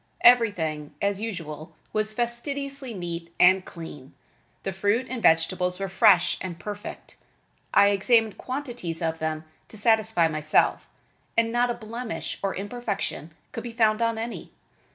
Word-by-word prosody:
Everything, 175 -12 +4
as 200 0 0
usual, 165 -8 -6 0.2
was 215 0 0
fastidiously 270 +3 -3
neat 170 -4 -5
and 185 +1 +6
clean. 150 -6 -10 0.5
The 195 - -3
fruit 205 +6 +1
and 250 -2 -4
vegetables 180 +1 +3
were 195 - -2
fresh 190 -2 +5
and 175 -2 -5
perfect. 205 +2 -8 0.5
I 200 0 +6
examined 220 +1 +3
quantities 245 - -4
of 160 0 -1
them 155 0 -2 0.2
to 220 - -10
satisfy 220 -5 +3
myself, 155 -1 +1 0.5
and 230 0 +3
not 240 +1 +2
a 240 - -1
blemish 230 +1 -5
or 195 -1 -1
imperfection 200 - -4 0.2
could 230 - -5
be 240 -1 -6
found 220 -1 +3
on 230 -1 +1
any. 230 +1 -5
205 Hz, 140 wpm, -26 LUFS, 170-230 Hz, 0.5 s, and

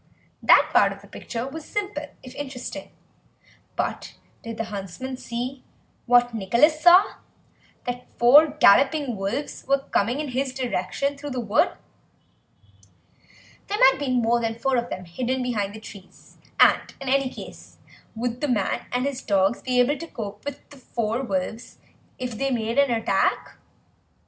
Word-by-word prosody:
That - - +5
part - - +5
of - - -10
the - - -14
picture 235 +1 -6
was 310 +3 -7
simple, 390 -8 -4 0.2
if 255 - -10
interesting, 270 -3 -7 0.9
but - - -3 0.3
did 230 -1 -7
the 225 - -1
huntsman 200 +7 -6
see, 255 +2 -5 0.4
what 245 0 +4
Nicholas 235 - +2
saw, 360 +4 +6 0.7
that 245 0 -5
four 280 +6 +7
galloping 280 -1 +4
wolves 205 +9 -4
were 275 +1 +4
coming 235 +7 +1
in 300 -2 -3
his 260 +1 -2
direction 260 +3 -2
through 290 - -6
the 255 -2 -3
wood? 235 - +2 1.9
There 410 - -2
might 270 -8 +5
be 285 -2 -2
more 240 -1 +2
than 225 0 -2
four 265 +2 0
of 240 0 -1
them 185 - -6
hidden 250 +9 -2
behind 210 -5 -2
the - - -8
trees, 200 -3 -14 0.2
and - - +4
in 270 - -8
any 270 0 +2
case - - -11 0.4
would 240 +2 -3
the 295 - 0
man 215 -7 -1
and 250 +1 0
his 280 -2 -3
dogs 195 +1 +1
be 250 -1 0
able 270 +3 +2
to 335 - -7
cope 210 -7 -7
with 285 -1 -7
the 285 - -13
four 235 -2 -2
wolves 220 0 -4 0.4
if 250 -1 -4
they 275 - 0
made 230 0 0
an 280 -1 +4
attack? 230 -2 0
250 Hz, 160 wpm, -24 LUFS, 230-275 Hz, 1.9 s, four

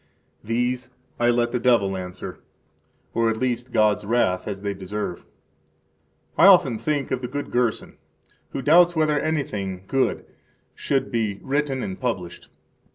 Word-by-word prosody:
These 125 +3 -1 0.3
I 120 0 +3
let 120 0 +2
the 125 - 0
devil 115 -6 +3
answer, 90 -1 -7 0.7
or 115 0 +2
at 110 0 -2
last 125 -1 -2
Gods 105 -2 +2
wrath, 100 -4 +1
as 100 -2 -4
they 100 0 -2
deserve. 95 -1 -5
6 - - -27 1.1
I 190 - +8
often 135 - +6
think 145 -3 -2
of 130 -1 -1
the 125 - -3
good 145 +3 -5
Gerson, 120 -3 -1 0.5
who 135 - -5
doubts 170 +4 +5
whether 155 -2 +2
anything 105 -12 -2
good 135 -1 0 0.5
should 135 -1 -1
be 110 -4 -1
[written 135 -1 -1
and] 95 - -5
published. 95 -9 -4
120 Hz, 150 wpm, -23 LUFS, 105-135 Hz, 1.1 s, I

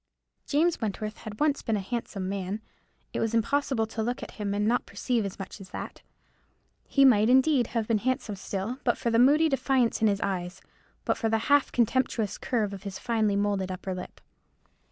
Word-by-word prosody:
James 320 +2 +2
Wentworth 215 0 -3
had 210 -1 -8
once 295 -2 +2
been 220 -2 0
a - - -2
handsome 200 -2 -4
man. 195 +1 -3 0.5
It - - -2
was 225 0 0
impossible 260 0 +1
to 220 0 -4
look 245 +3 -2
at - - -8
him 205 -2 -3
and 205 +1 +1
not 240 +2 +1
perceive 240 -4 -1
as 195 - -5
much 195 +1 -8
as 190 - -11
that. - - -7 0.9
He 275 -1 +4
might, 220 -4 +5
indeed, 260 -1 +4
have 225 -3 -2
been 225 -2 +2
handsome 235 -2 -1
still, 200 +5 -4
but 240 - +2
for 235 - -1
the 230 - +3
moody 295 +6 +6
defiance 265 -5 +1
in 220 - +5
his 200 -1 +1
eyes, 185 -1 -3 0.5
but - - 0
for 225 - +1
the 225 - +2 0.2
half 285 -1 +4
contemptuous 235 -3 0
curve 215 -5 -1
of 195 - -7
his 195 -2 -6
finely 220 -4 +1
moulded 200 -2 0
upper 185 +1 -4
lip. 180 0 -8
220 Hz, 195 wpm, -28 LUFS, 200-250 Hz, 0.9 s, moody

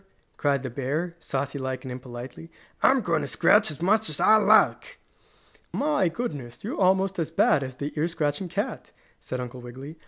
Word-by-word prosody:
cried 140 -2 0
the 130 - -3
bear, 150 +7 -2
saucy 140 -1 -3
like 130 0 -4
and 130 - -5
impolitely. 125 -7 -8 0.3
"I'm - - +5
going - - 0
to - - -3
scratch - - +4
as 155 +2 -6
much 215 +1 +2
as 155 - -5
I 200 +5 +6
like!" - - +3 0.7
"My 295 - +1
goodness! 145 - -6
You're 215 0 -3
almost 190 0 +2
as 160 -2 -1
bad 160 -3 +3
as 130 -1 -5
the 145 +3 -5
ear 155 +2 +1
scratching 160 +1 -2
cat!" - - -4 0.3
said 130 - -5
Uncle 125 0 -6
Wiggily. 130 +6 -9
145 Hz, 180 wpm, -26 LUFS, 130-180 Hz, 0.7 s, I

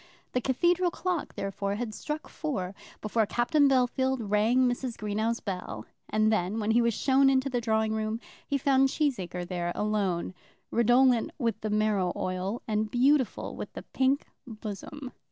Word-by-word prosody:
The 250 - 0
cathedral 350 +8 +2
clock, 355 -2 -3
therefore, 200 0 -2
had 220 0 -4
struck 300 +7 -5
four 200 - -3 0.3
before 215 0 +1
Captain 280 +6 +3
Bellfield 260 0 +2
rang 230 +5 +4
Mrs. 245 -1 -2
Greenow's 215 +2 -1
bell, 180 - -5 0.2
and 215 0 +3
then, 205 +2 0
when 215 0 0
he 235 +2 +4
was 235 -2 +1
shown 270 0 +4
into 265 0 +2
the 245 -1 0
drawing 220 -1 +1
room, 220 +1 -2 0.3
he 280 - +1
found 270 0 +3
Cheesacre 185 - -1
there 175 -1 -2
alone, 200 -5 -1 0.4
redolent 240 +1 +4
with 230 -5 -1
the 215 - -2
marrow 210 -4 +1
oil, 185 +5 -3
and 215 0 0
beautiful 260 +2 +2
with - - -6
the - - -7
pink 265 +2 +2 0.2
bosom. 230 +5 -7
230 Hz, 155 wpm, -28 LUFS, 210-265 Hz, 0.4 s, rang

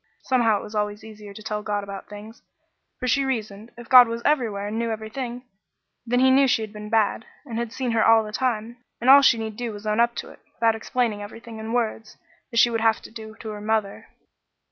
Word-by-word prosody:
Somehow 230 -5 +2
it - - -9
was 210 - -10
always 210 0 -2
easier 210 -2 -11
to 215 +2 -11
tell 210 -1 -3
God 205 -1 -2
about 200 -1 -8
things; 210 +2 -11 0.6
for 255 - -3
she 275 +2 +2
reasoned, 220 -4 -4
if 240 -1 -11
God 250 -2 +9
was 230 +1 -5
everywhere 220 -9 0
and 220 +2 -3
knew 230 0 -1
everything, 235 +3 -5 0.6
then 245 +1 +2
he 260 0 +5
knew 270 +1 +5
she 235 -3 +1
had 215 -1 -8
been 210 0 -8
bad, 220 0 +1 0.2
and 230 -4 -4
had 235 -2 -3
seen 255 -1 -3
her 225 -1 +2
all 225 -1 +5
the 210 - -8
time, 235 -1 -2 0.2
and 250 +3 +5
all 280 +1 +9
she 260 -4 +5
need 220 -1 -5
do 240 -2 -3
was 205 0 -9
to 215 - -1
own 210 - 0
up 235 0 +3
to - - -6
it, - - -17 0.2
without 230 -1 +2
explaining 225 -1 -2
everything 225 +2 -10
in 220 +1 -6
words, 225 -2 -2 0.3
as 230 - +1
she 240 0 +5
would 225 -1 -1
have 225 -1 +3
to - - -12
do 220 -1 -10
to 220 - -6
her 210 -1 -7
mother. 215 -2 -2
225 Hz, 240 wpm, -24 LUFS, 215-240 Hz, 0.6 s, God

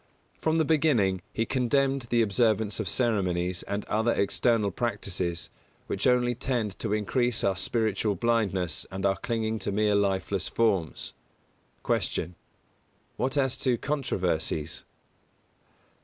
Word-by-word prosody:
From 160 0 +1
the 160 - +3
beginning, 130 - +2
he 115 - -1
condemned 135 +1 +1
the 120 -1 +3
observance 110 -1 +1
of 110 - -2
ceremonies 90 -6 0
and 100 +1 -4
other 110 +2 +1
external 100 +2 +2
practices, 90 -6 -2 0.3
which 100 - -1
only 125 -1 +3
tend 120 -4 -2
to 110 - -2
increase 115 +3 +1
our 95 - +2
spiritual 110 0 0
blindness 100 -8 0
and 95 +1 -4
our 95 0 +2
clinging 110 -1 -2
to 100 - -2
mere 105 +1 +2
lifeless 100 -1 0
forms. 95 -9 0 0.7
185. 85 - 0
Q. - - -14
_What 130 +2 0
as 135 -2 +2
to 125 -3 +1
controversies? 90 - -1
110 Hz, 125 wpm, -28 LUFS, 95-120 Hz, 0.7 s, the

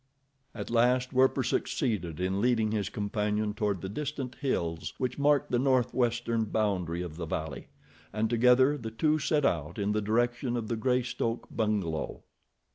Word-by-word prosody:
At 105 0 -5
last 125 +2 +2
Werper 130 +1 +3
succeeded 105 - -1
in 95 +2 0
leading 115 -3 +2
his 105 -3 -1
companion 105 0 -1
toward 105 -3 -1
the 95 - -4
distant 135 +3 -4
hills 85 - -2
which 130 +2 -2
mark 145 -1 +3
the 120 - +1
northwestern 120 -3 +1
boundary 95 -6 -1
of 80 -3 -7
the 85 -2 -4
valley, 80 -4 -4 0.4
and 110 +2 0
together 125 +5 +4
the 115 -2 -5
two 155 +7 +1
set 150 -1 +1
out 80 - -1
in 100 0 0
the 105 0 0
direction 120 +3 0
of 110 -2 -4
the 115 - 0
Greystoke 125 -1 -1
bungalow. 100 -8 -1
115 Hz, 155 wpm, -29 LUFS, 100-125 Hz, 0.4 s, together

